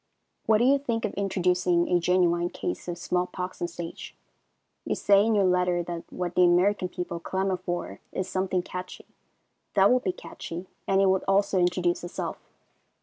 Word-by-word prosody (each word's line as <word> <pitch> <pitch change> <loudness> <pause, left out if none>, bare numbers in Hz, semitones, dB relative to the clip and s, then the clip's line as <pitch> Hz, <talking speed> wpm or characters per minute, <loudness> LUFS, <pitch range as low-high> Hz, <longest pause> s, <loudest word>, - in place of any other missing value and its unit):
What 220 - +5
do 230 - +2
you 275 +3 +4
think 230 -5 -2
of 210 - -3
introducing 180 -3 +1
a 180 -1 +3
genuine 175 -1 +2
case - - -5
of 175 -1 -4
small 180 +1 -1
pox 180 0 -6
on - - +1
the - - -12
stage? 170 -1 -8 0.7
You - - -1
say 200 0 +4
in 225 0 +2
your 200 - +4
letter 180 -1 +2
that 170 -1 -6
what 180 -1 -3
the 180 - +3
American 180 +2 +3
people 180 -2 -5
clamor 190 +2 -1
for 175 0 -4
is 185 - -3
something 185 -1 -1
"catchy." 185 0 -7 0.7
That 195 +2 +6
would 250 0 +3
be 185 - +1
catchy, 175 0 -8 0.2
and 195 0 +3
it 195 - +4
would 190 0 +2
also 195 0 +3
introduce 175 -1 +1
itself. 175 - -5
180 Hz, 185 wpm, -27 LUFS, 175-195 Hz, 0.7 s, That